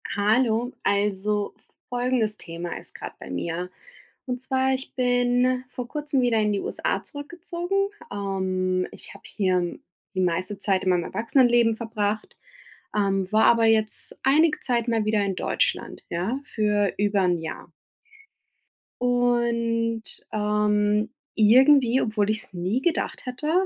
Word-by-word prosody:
Hallo! 225 +3 +2
Also 205 0 0 0.4
folgendes 245 -3 0
Thema 170 0 -6
ist - - -13
gerade - - -8
bei - - -10
mir. 170 - -3 0.6
Und 250 -2 -4
zwar 265 0 +1
ich 265 +1 -4
bin 245 0 +2
vor 250 -1 -6
kurzem 295 -1 -1
wieder 240 -2 +2
in 210 -1 +2
die 200 - 0
USA - - -2
zurückgezogen. 350 +6 -3 0.2
Ähm, 185 -2 -1
ich - - -8
habe - - -15
hier 185 -4 -1 0.3
die 190 - -3
meiste 185 +3 -1
Zeit 190 -1 +1
in 185 - +1
meinem 180 -2 +2
Erwachsenenleben 235 -1 +3
verbracht, 215 -2 -3 0.6
ähm, 195 -2 0
war 215 +1 +4
aber 230 -1 +5
jetzt 220 -1 +2
einige 300 +4 +4
Zeit 240 -2 0
mal 225 -2 +1
wieder 215 -1 +2
in 195 -1 -1
Deutschland, 485 - -1
ja, 190 +10 -2 0.2
für 210 -2 +1
über 205 0 +2
'n 180 -2 +2
Jahr. 160 0 -7 1.3
Und, 235 -2 +1 0.3
ähm, 210 0 +1 0.2
irgendwie, 255 +3 +5
obwohl 210 -2 0
ich 215 0 0
es - - -14
nie 185 +8 -1
gedacht 340 -2 -1
hätte, 255 +5 -3
220 Hz, 135 wpm, -25 LUFS, 200-245 Hz, 1.3 s, aber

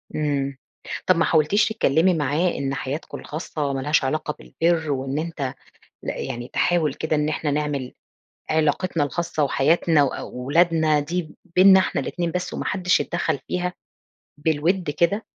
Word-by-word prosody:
إمم، 140 -3 -1 0.5
طَب 185 - +5
ما 165 - +2
حاولتيش 165 +6 +3
تتكلمي 180 -4 +3
معاه 155 +3 +1
إن 135 0 -2
حياتكم 140 +2 -5
الخاصة 150 -2 -4
ما 135 - -2
لهاش 150 +2 +2
علاقة 150 +2 -1
بالبِرّ 165 -2 0
وإن 135 +1 -2
أنت 155 -5 -3 0.5
لأ - - -3
يعني 120 +1 -5
تحاول 165 -5 +2
كده 155 +2 -1
إن 150 0 +1
إحنا 155 -1 -1
نعمل 145 -3 -2 0.6
علاقتنا 160 +1 +1
الخاصة، 160 +1 -1
وحياتنا 150 +2 +3
وأولادنا 155 +4 +1
دي 160 +2 -4 0.2
بينّنا 190 +1 +8
إحنا 185 - 0
الاتنين 170 -2 -2
بس، 180 +1 -3
وما - - -4
حدش 180 -2 +2
يتدخّل 160 -4 -1
فيها، 180 0 -2 0.6
بالوِدّ 160 +4 0
كده؟ 170 +8 +1
155 Hz, 145 wpm, -23 LUFS, 145-170 Hz, 0.6 s, بينّنا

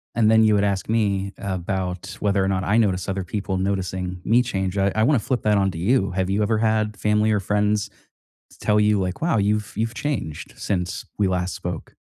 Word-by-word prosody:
and 110 -2 +4
then 110 0 +6
you 110 -1 +4
would 100 - +2
ask 100 -1 -1
me 100 -3 0
about 95 -1 -3
whether 100 -2 +1
or 95 - +1
not 95 -1 0
I 105 +4 +2
notice 95 -5 +1
other 95 0 -2
people 95 0 -3
noticing 95 -2 -2
me 120 +3 +4
change, 95 -5 -2
I 100 0 +2
I 110 - +2
wanna 135 0 +4
flip 125 +1 -2
that 105 -1 +3
onto 95 -3 0
you, 100 +2 +1
have 95 0 -1
you 100 +2 +1
ever 110 +1 +1
had 110 -2 +1
family 105 +1 +2
or 105 - +2
friends 105 +2 0 0.6
t - - -18
tell 105 0 +2
you, 105 -1 +3
like, 90 +5 -3
"Wow, 165 -8 +2
you've 105 +1 0
you've 115 +1 -1
changed 120 - -4
since 90 -3 -2
we 100 - +3
last 90 0 -1
spoke?" 90 -2 -6
100 Hz, 215 wpm, -23 LUFS, 95-105 Hz, 0.6 s, then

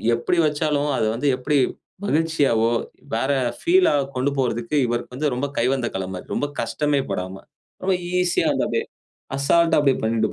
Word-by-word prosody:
எப்படி 120 +9 -1
வைச்சாலும், 150 -1 0
அதை 110 - +1
வந்து 135 +5 -1
எப்படி 145 +3 0 0.5
மகிழ்ச்சியாவோ, 150 - +2 0.5
வேற 130 +5 0 0.3
ஃபீல்ல 365 +2 +4 0.3
கொண்டு 130 +2 +1
போறதுக்கு 120 +1 -1
இவருக்கு 120 +1 -3
வந்து 145 +1 0
ரொம்ப 130 +3 -1
கைவந்த 125 +1 +1
கல 95 -1 -2
மாரி, 90 - -7
ரொம்ப 145 - 0
கஷ்டமே 145 +4 0
படாம. 95 0 -3 0.5
ரொம்ப 190 0 +2 0.3
ஈசியா 180 -1 +1
வந்து - - 0
அப்படியே - - -1 0.5
அசால்ட்டா 165 +5 +3
அப்படியே 140 -3 +2
பண்ணிட்டு 110 0 +1
135 Hz, 150 wpm, -22 LUFS, 115-150 Hz, 0.5 s, ஃபீல்ல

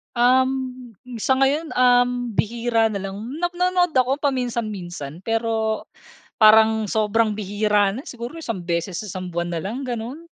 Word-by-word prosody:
Um, 255 -1 +1 0.2
sa 265 +4 +2
ngayon, 285 +4 +1
um, 245 -1 +3
bihira 230 +1 +1
na 200 -3 -4
lang. 195 +1 -6 0.2
Nap 350 +2 -1
nanonood 360 0 +1
ako 260 -1 +2
paminsan-minsan, 215 - -3
pero 225 +1 -1 0.5
parang 220 -1 +5
sobrang 220 +1 +2
bihira 205 -1 +1
na, 255 - -6
siguro 245 -2 -8
isang 245 - -4
beses 170 +1 -2
isang 185 -1 -6
buwan 175 0 -3
na 165 - -3
lang, 245 +8 -4
ganun. 245 +7 -5
230 Hz, 140 wpm, -22 LUFS, 205-255 Hz, 0.5 s, parang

